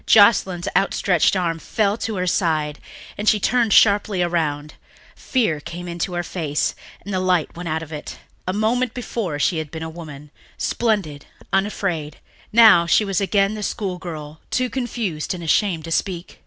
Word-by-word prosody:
Joscelyn's 195 -5 +5
outstretched 195 -2 +2
arm 170 -3 -1
fell 205 +4 0
to 225 - -3
her 180 -1 -1
side 155 -5 0 0.4
and 210 - +3
she 215 - +3
turned 235 +1 +2
sharply 200 -2 +4
around; 150 -4 -1 0.4
fear 220 - 0
came 175 +4 -7
into 175 +2 -3
her 175 0 -1
face 155 -4 -1 0.3
and 200 - -5
the 185 - +1
light 185 -3 +1
went 170 0 -5
out 160 +1 -1
of 160 - -11
it. 150 - -7 0.3
A - - +1
moment 225 +4 0
before 225 -10 -3
she 160 +3 +1
had 155 -2 -5
been 160 +2 -6
a 160 - -5
woman, 150 -3 -10 0.3
splendid, 195 -11 -1 0.3
unafraid; 190 -6 -1 0.3
now 215 -7 +7
she 210 - +4
was 195 -1 0
again 195 +1 +2
the 215 - -5
schoolgirl, 175 -7 -5
too 255 -1 0
confused 220 -11 -3
and 170 -2 -7
shamed 175 -2 +2
to 165 - -7
speak. 175 0 -2
180 Hz, 170 wpm, -21 LUFS, 160-205 Hz, 0.4 s, now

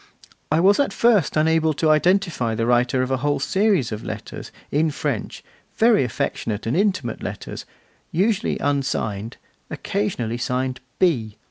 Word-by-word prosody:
I 155 - +3
was 195 +4 +4
at 285 - +2
first 215 -11 +2
unable 160 0 +3
to 155 +1 +2
identify 165 - +2
the 115 +1 -1
writer 125 +2 +2
of 130 - -3
a 130 - +2
whole 145 +2 0
series 190 - +1
of 105 0 -5
letters - - -7 0.2
in 155 +2 +2
French, 140 -5 -4 0.3
very 225 - +4
affectionate 110 -2 -3
and 115 - 0
intimate 185 - 0
letters, - - -6 0.5
usually 200 +4 +1
unsigned, 115 -7 -2 0.3
occasionally 115 +3 -2
signed 130 +1 -2 0.2
'B. 115 - +1
145 Hz, 140 wpm, -22 LUFS, 120-175 Hz, 0.5 s, was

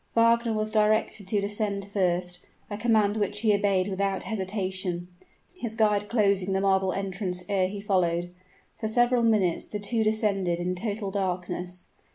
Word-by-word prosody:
Wagner 230 0 +4
was 215 0 -1
directed 215 -1 +1
to 205 +1 +1
descend 200 -1 -2
first, 180 -2 0 0.3
a 205 - -3
command 215 -3 +2
which 205 0 0
he 220 -2 +4
obeyed 200 -2 +2
without 195 0 -1
hesitation, 190 -3 -3 0.5
his 235 -10 -5
guide 210 -2 +2
closing 200 -4 +2
the 190 - +1
marble 190 -1 +2
entrance 185 -1 -3
ere 195 -3 +1
he 200 +2 -6
followed. 175 -3 0 0.5
For 220 - -2
several 240 +2 +3
minutes 210 -7 +2
the 210 - -4
two 220 +2 0
descended 200 -5 +1
in 180 +1 -1
total 205 +1 -3
darkness. 180 -2 -3
200 Hz, 155 wpm, -27 LUFS, 185-215 Hz, 0.5 s, Wagner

